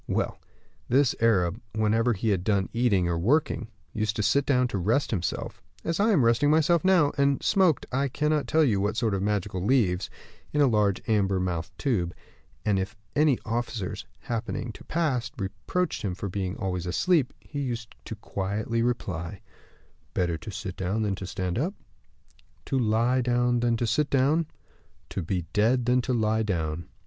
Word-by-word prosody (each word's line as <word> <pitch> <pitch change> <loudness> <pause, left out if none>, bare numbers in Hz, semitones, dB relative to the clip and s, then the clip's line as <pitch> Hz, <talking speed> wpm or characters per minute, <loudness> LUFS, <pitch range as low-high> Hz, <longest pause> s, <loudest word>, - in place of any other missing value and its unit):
Well, - - -1 0.5
this 135 +1 +4
Arab, 100 -2 +2
whenever 110 +2 +2
he 110 +2 -1
had 95 -4 +1
done 100 -2 +1
eating 110 -7 +2
or 85 -1 0
working, 130 - +1 0.3
used 110 0 -1
to 105 - -1
sit 140 +6 +2
down 125 -3 +3
to 100 - -2
rest 110 +10 +1
himself, 95 -6 -3 0.2
as 165 +1 -1
I 210 +3 +4
am 160 - +4
resting 120 +5 +3
myself 160 +2 +3
now, 180 -6 +4
and 140 -1 +2
smoked 185 -7 +3
I 135 +2 +1
cannot 150 +2 0
tell 160 +1 +4
you 105 -9 +2
what 105 +2 -1
sort 115 -3 +1
of 95 - -1
magical 100 -2 -1
leaves, 100 -6 +2 0.4
in 150 - +1
a 145 - +6
large 105 -6 +1
amber 100 -3 +2
mouthed 90 0 -3
tube; 95 - -1 0.5
and 100 -3 +2
if 100 +2 -4 0.2
any 150 -4 +4
officers, 115 -3 -3
happening 115 +1 -3
to - - -13
pass, 135 -8 0
reproached 100 - -2
him 95 -6 -2
for 100 +1 -4
being 95 0 -3
always 90 -3 -3
asleep, 145 - +2
he 145 - -7
used 120 -4 -4 0.3
quietly 105 +4 -2
to 115 - +2
reply: 95 -5 -3 0.8
'Better 85 -2 +1
to 80 - -8
sit 105 -3 -5
down 100 +4 -1
than 105 -2 0
to 95 -1 -5
stand 95 0 -2
up, 180 +9 -1 0.9
to 135 - 0
lie 120 +3 +2
down 120 0 +2
than 120 -1 +1
to 120 - 0
sit 140 +7 +1
down, 145 +4 +2 0.6
to - - -2
be 90 0 -2
dead 115 +4 +3
than 125 +1 +3
to 125 - -2
lie 110 -2 +1
down. 85 -6 -2
110 Hz, 175 wpm, -27 LUFS, 95-130 Hz, 0.9 s, a